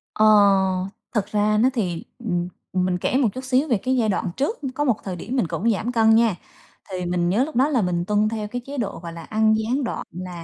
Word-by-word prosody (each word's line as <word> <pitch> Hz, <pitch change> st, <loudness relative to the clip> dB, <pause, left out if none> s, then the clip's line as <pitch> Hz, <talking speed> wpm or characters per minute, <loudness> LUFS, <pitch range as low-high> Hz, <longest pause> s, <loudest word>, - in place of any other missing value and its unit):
Ờ, 215 Hz, -, +4 dB, 0.9 s
thực 205 Hz, -, +1 dB
ra 210 Hz, +1 st, +1 dB
nó 240 Hz, +4 st, +4 dB
thì, 180 Hz, -9 st, -2 dB, 0.2 s
ừm, 175 Hz, -7 st, -2 dB, 0.3 s
ừm, 185 Hz, -1 st, +1 dB
mình 180 Hz, -1 st, 0 dB
kể 250 Hz, -, 0 dB
một 265 Hz, -4 st, +3 dB
chút 260 Hz, -, -6 dB
xíu 260 Hz, +3 st, +1 dB
về 240 Hz, -6 st, +2 dB
cái 260 Hz, +6 st, -1 dB
giai 220 Hz, -3 st, +2 dB
đoạn 185 Hz, -2 st, -1 dB
trước, 295 Hz, -, -1 dB, 0.2 s
có 290 Hz, -, 0 dB
một 250 Hz, -6 st, +2 dB
thời 185 Hz, -2 st, -4 dB
điểm 225 Hz, +9 st, -5 dB
mình 245 Hz, -10 st, +1 dB
cũng 230 Hz, +7 st, 0 dB
giảm 220 Hz, +4 st, -2 dB
cân 225 Hz, -2 st, +4 dB
nha. 225 Hz, -4 st, +3 dB, 0.5 s
Thì 180 Hz, -2 st, -4 dB
mình 175 Hz, 0 st, 0 dB
nhớ 210 Hz, +8 st, +2 dB
lúc 310 Hz, -, -9 dB
đó 260 Hz, +4 st, +4 dB
là 255 Hz, -7 st, +2 dB
mình 175 Hz, -2 st, -1 dB
tuân 210 Hz, +2 st, +2 dB
theo 215 Hz, -1 st, -3 dB
cái 245 Hz, +4 st, -5 dB
chế 280 Hz, +1 st, -7 dB
độ, 230 Hz, -6 st, -3 dB
gọi 170 Hz, -1 st, -8 dB
là, 165 Hz, -, -8 dB
ăn 220 Hz, +2 st, +2 dB
gián 240 Hz, +6 st, -1 dB
đoạn, 240 Hz, -, -3 dB
là 180 Hz, -1 st, -7 dB
215 Hz, 255 wpm, -23 LUFS, 185-245 Hz, 0.9 s, Ờ